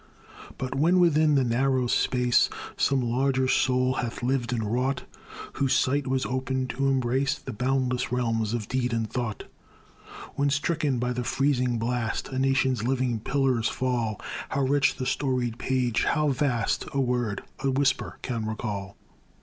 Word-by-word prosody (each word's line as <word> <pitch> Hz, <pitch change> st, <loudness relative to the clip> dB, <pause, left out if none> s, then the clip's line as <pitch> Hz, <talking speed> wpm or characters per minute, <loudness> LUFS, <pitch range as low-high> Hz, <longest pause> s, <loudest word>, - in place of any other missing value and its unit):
But 130 Hz, -1 st, -3 dB
when 165 Hz, +7 st, +3 dB
within 155 Hz, -3 st, +4 dB
the 135 Hz, -, +4 dB
narrow 130 Hz, +2 st, +1 dB
space 125 Hz, 0 st, +2 dB, 0.3 s
Some 135 Hz, -1 st, +2 dB
larger 130 Hz, +2 st, +1 dB
soul 130 Hz, 0 st, +2 dB
hath 120 Hz, 0 st, -4 dB
lived 125 Hz, -1 st, 0 dB
and 115 Hz, -3 st, -1 dB
wrought, 130 Hz, +2 st, 0 dB, 0.5 s
Whose 135 Hz, -1 st, +1 dB
sight 140 Hz, +2 st, +1 dB
was 130 Hz, 0 st, 0 dB
open 130 Hz, 0 st, -1 dB
to 135 Hz, +1 st, -1 dB
embrace 135 Hz, +1 st, +1 dB
The -, -, -8 dB
boundless 125 Hz, +2 st, 0 dB
realms 115 Hz, -3 st, 0 dB
of 110 Hz, -3 st, -4 dB
deed 125 Hz, -2 st, -1 dB
and 115 Hz, -1 st, 0 dB
thought, 110 Hz, -1 st, -3 dB, 0.9 s
When, 140 Hz, 0 st, +1 dB
stricken 145 Hz, -1 st, 0 dB
by 125 Hz, +1 st, -1 dB
the 125 Hz, 0 st, -2 dB
freezing 125 Hz, -2 st, +1 dB
blast, 115 Hz, 0 st, -2 dB
A 130 Hz, -, -3 dB
nation's 130 Hz, -3 st, +2 dB
living 125 Hz, -2 st, 0 dB
pillars 130 Hz, -1 st, +1 dB
fall, 120 Hz, -5 st, -1 dB, 0.3 s
How 140 Hz, -, -1 dB
rich 140 Hz, +1 st, +2 dB
the 130 Hz, -, -4 dB
storied 125 Hz, -4 st, -1 dB
page, 125 Hz, -3 st, 0 dB
how 150 Hz, -2 st, +2 dB
vast, 125 Hz, -4 st, 0 dB
A 140 Hz, -, 0 dB
word, 120 Hz, -5 st, -1 dB, 0.2 s
a 135 Hz, -, 0 dB
whisper, 135 Hz, +1 st, 0 dB
can 115 Hz, -4 st, -3 dB
recall! 105 Hz, -3 st, -4 dB
130 Hz, 155 wpm, -26 LUFS, 120-135 Hz, 0.9 s, within